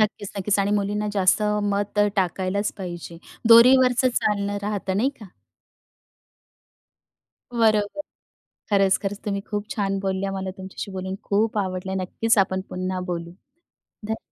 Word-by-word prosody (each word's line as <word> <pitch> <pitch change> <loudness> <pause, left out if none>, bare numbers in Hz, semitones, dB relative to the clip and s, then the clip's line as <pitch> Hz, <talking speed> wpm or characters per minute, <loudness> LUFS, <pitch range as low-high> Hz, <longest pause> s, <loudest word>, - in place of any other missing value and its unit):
नक्कीच, 210 -1 0
नक्कीच 200 +1 0
आणि 200 +1 +1
मुलींना 210 +1 -1
जास्त 195 +1 +3 0.2
मत 205 0 -1 0.2
टाकायलाच 190 +2 0
पाहिजे, 175 -2 -7 0.3
दोरीवरचं 250 +2 +7
चालणं 205 -1 0
राहतं 200 -2 -2
नाही 260 +6 +2
का? 210 - -9 2.2
बरोबर. 220 +3 +1 0.7
खरंच, 195 -1 +4
खरंच 200 0 -3
तुम्ही 200 -1 -1
खूप 210 0 -3
छान 195 -3 -1
बोलल्या. 195 0 -1
मला 190 -1 -3
तुमच्याशी 190 +1 -7
बोलून 190 0 -4
खूप 215 +2 0
आवडलं. 190 -1 -2
नक्कीच 225 +4 +1
आपण 190 -1 +2
पुन्हा 185 0 -3
बोलू, 170 0 -5 0.8
ध 220 - -1
200 Hz, 125 wpm, -24 LUFS, 190-210 Hz, 2.2 s, दोरीवरचं